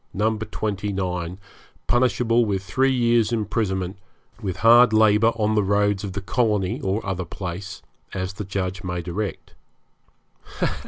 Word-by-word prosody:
29, 100 -4 -2 0.5
punishable 120 -1 +2
with 100 -3 -1
three 135 +6 +1
years' 120 -3 +2
imprisonment, 100 -4 -1 0.4
with 95 -4 -3
hard 120 0 +7
labour 110 +1 +5
on 110 -1 +1
the 105 - +3
roads 100 0 +1
of 100 -2 -5
the 100 - -4
colony 105 -3 0
or 95 +3 -1
other 95 -2 -2
place, 90 +2 -7 0.3
as 95 0 -3
the 105 +2 -5
Judge 95 -1 -3
may 90 -1 -3
direct. 95 +2 -5
100 Hz, 125 wpm, -23 LUFS, 95-110 Hz, 0.5 s, hard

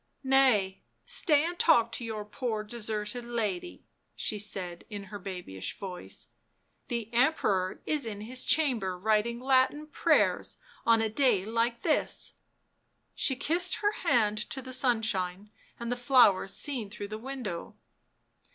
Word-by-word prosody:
" - - -43 0.2
Nay, 205 -8 +3 0.2
stay 300 -4 +4
and 345 +1 -4
talk 235 -8 +4
to 235 - -3
your 220 -2 -4
poor 220 0 -3
deserted 215 +1 -4
lady," 210 - -3 0.3
she 210 - -2
said 185 -4 -3
in 205 -2 -6
her 205 - -5
babyish 180 - -6
voice. 185 -2 -5 0.3
" - - -45
The 235 -2 -4
Emperor 215 -8 +1
is 300 -6 -1
in 205 -2 -5
his 250 +4 -2
chamber 235 -12 +1
writing 220 +4 +1
Latin 265 +3 +2
prayers 305 - +1
— - - -26
on 225 -1 +5
a - - +2
day 220 -5 +2
like 230 +2 -1
this 315 - 0 0.4
!" - - -46 0.3
She 265 - +2
kissed 340 +7 +1
her 415 0 +1
hand 225 - +1
to 270 - -2
the 260 0 -6
sunshine 210 -6 0 0.3
and 235 0 -4
the - - +1
flowers 240 -6 +4
seen 255 -8 -2
through 205 -1 -7
the 215 +1 -5
window. 240 -8 -6
225 Hz, 150 wpm, -29 LUFS, 205-255 Hz, 0.4 s, on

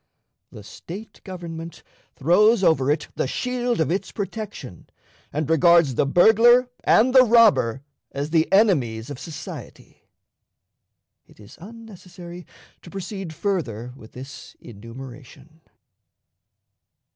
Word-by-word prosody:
The 105 - -12
State 190 - -11
government 170 -3 -8 0.3
throws 200 - +3
over 140 -6 +2
it 150 +1 -1
the - - -2
shield 245 - -2
of 160 -1 0
its 195 +2 -3
protection, 200 - -7 0.4
and 150 0 -3
regards 165 -2 +4
the 135 - 0
burglar 235 - +5
and 250 +3 +3
the 260 -1 +8
robber 215 - +3 0.3
as 145 +2 -5
the 160 -1 +1
enemies 140 - +2
of 140 - -8
society. 160 -3 -10 1.3
It - - -22
is 105 -1 -15
unnecessary 185 -5 -12 0.3
to - - -13
proceed 195 -1 -7
further 135 - -3
with 110 -4 -16
this 135 +2 -11
enumeration. 130 +7 -13
170 Hz, 110 wpm, -22 LUFS, 135-205 Hz, 1.3 s, the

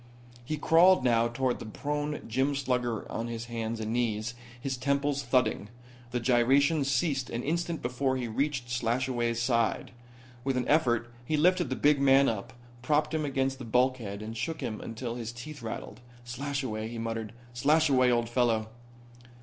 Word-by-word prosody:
He 155 +5 -3
crawled 170 +2 +5
now 115 -2 +3
toward 125 +1 -1
the - - -7
prone 145 +5 -3
gym 130 +5 +1
slugger 125 -4 -1
on 115 - -3
his 115 -1 -5
hands 115 -1 -4
and 110 0 -3
knees, 115 -1 -1 0.3
his 135 +1 -2
temples 140 +2 0
thudding. 120 -5 +1 0.4
The 125 +1 -1
gyrations 135 +5 +3
ceased 135 -1 0
an 120 +1 -3
instant 170 +2 -2
before 130 +2 0
he 125 -2 -3
reached 135 +2 -1
Slashaway's 120 0 0
side. 115 -1 +1 0.5
With 135 -1 0
an 125 - -1
effort 120 -6 +2
he 155 +5 0
lifted 180 +3 +3
the 130 - -1
big 145 0 +3
man 135 0 +6
up, 115 +3 -3 0.3
propped 150 +3 +1
him 155 -1 0
against 135 -1 -1
the - - -6
bulkhead 120 -4 0
and 110 +1 -6
shook 160 +8 -3
him 110 -2 -4
until 115 +1 -5
his 115 -1 -4
teeth 145 +4 -9
rattled. 110 -1 -6 0.3
"Slashaway," 125 -3 -3
he 115 +1 -7
muttered. 115 -1 -3 0.2
"Slashaway, 140 0 +4
old 120 -1 +2
fellow." 115 -2 +1
125 Hz, 165 wpm, -29 LUFS, 115-140 Hz, 0.5 s, man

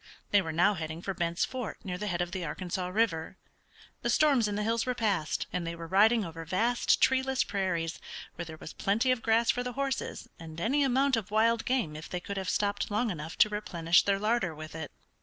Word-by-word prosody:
They 205 - +5
were 165 -3 -4
now 175 +6 +3
heading 160 -1 -5
for 195 - -2
Bent's 170 -1 0
Fort 255 -3 -5
near 180 -2 -4
the 210 - -3
head 175 -3 -1
of 175 - -7
the 185 -1 -3
Arkansas 180 +1 -3
River. 185 -4 0 0.6
The - - -1
storms 275 -7 +4
in 205 - -2
the 210 - -1
hills 225 +1 +1
were 250 - 0
past, 200 -10 0
and 180 - 0
they 170 - -3
were 165 0 -7
riding 210 +5 +4
over 165 0 -7
vast 220 +9 +2
treeless 265 0 +3
prairies, 175 -5 -2 0.3
where 170 - -6
there 160 -1 -9
was 155 - -9
plenty 225 +6 +1
of 255 -3 0
grass 230 +1 +3
for 245 - -2
the 250 0 -4
horses, 275 -1 -3
and 160 0 -9
any 270 +10 +2
amount 270 0 +3
of 215 -2 -4
wild 225 +2 +2
game 245 -13 0
if 155 - -8
they 180 - -3
could 200 +2 -6
have 190 -2 -2
stopped 205 +3 0
long 215 +2 0
enough 160 -1 -6
to 215 - +5
replenish 175 -5 +2
their 200 -1 +1
larder 210 -5 0
with 155 +1 -9
it. 160 -2 -6
200 Hz, 225 wpm, -30 LUFS, 170-230 Hz, 0.6 s, They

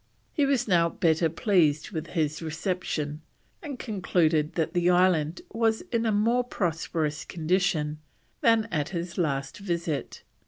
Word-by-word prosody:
He 285 -2 +2
was 275 -5 +1
now 170 -4 +4
better 165 -2 +2
pleased 165 -2 +2
with 165 -3 -4
his 155 0 0
reception, 160 -2 -3 0.4
and 290 -5 -6
concluded 170 - +1
that 165 -1 -1
the 175 0 +2
island 175 -3 +3
was 225 -1 +1
in 230 -1 +1
a - - +2
more 230 +4 +2
prosperous 165 -7 -2
condition 160 -3 0 0.4
than 225 -2 +4
at 150 -3 -1
his 170 0 -4
last 140 -3 -1
visit. 170 -7 -3
170 Hz, 135 wpm, -27 LUFS, 155-205 Hz, 0.4 s, now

